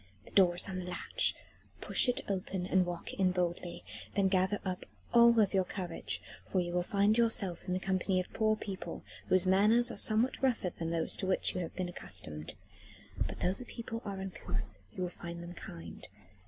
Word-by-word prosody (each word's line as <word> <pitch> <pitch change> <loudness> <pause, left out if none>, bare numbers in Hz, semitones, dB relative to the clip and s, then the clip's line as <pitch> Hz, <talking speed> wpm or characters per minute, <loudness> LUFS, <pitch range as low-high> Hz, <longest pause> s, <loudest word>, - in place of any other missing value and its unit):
"The - - -14
door 180 -3 +5
is 175 - +1
on 190 -1 -4
the 180 - -5
latch. 180 - +1 0.4
Push - - +2
it 245 - +1
open 190 -1 -2
and 185 -1 +3
walk 175 -1 -5
in 185 -1 +2
boldly. 175 -1 -2 0.3
Then 195 -1 +3
gather 190 +2 +2
up 185 -1 -3 0.3
all 235 0 +8 0.2
your 190 -1 +4
courage, 175 - -4 0.3
for 185 - +2
you 175 -1 -2
will 180 - +2
find 200 +4 +2
yourself 205 -6 +3
in 180 - 0
the 185 - 0
company 185 0 +1
of 185 - -5
poor 215 -1 +2
people, 200 -3 -6 0.2
whose 185 0 +3
manners 210 +6 +5
are - - -7
somewhat 225 +5 +4
rougher 240 -9 +1
than 165 -1 -4
those 165 -1 +1
to 190 - -2
which 185 - +3
you 180 - -2
have 170 - -6
been 185 -1 -2
accustomed. 85 - -4 0.7
But - - -8
though 180 - +2
the 250 - -8
people 230 -1 -6
are 200 -2 -5
uncouth, 105 - -5
you 185 - -4
will 180 - -1
find 170 0 -7
them 175 +1 -7
kind. 85 - -7
185 Hz, 195 wpm, -33 LUFS, 175-200 Hz, 0.7 s, all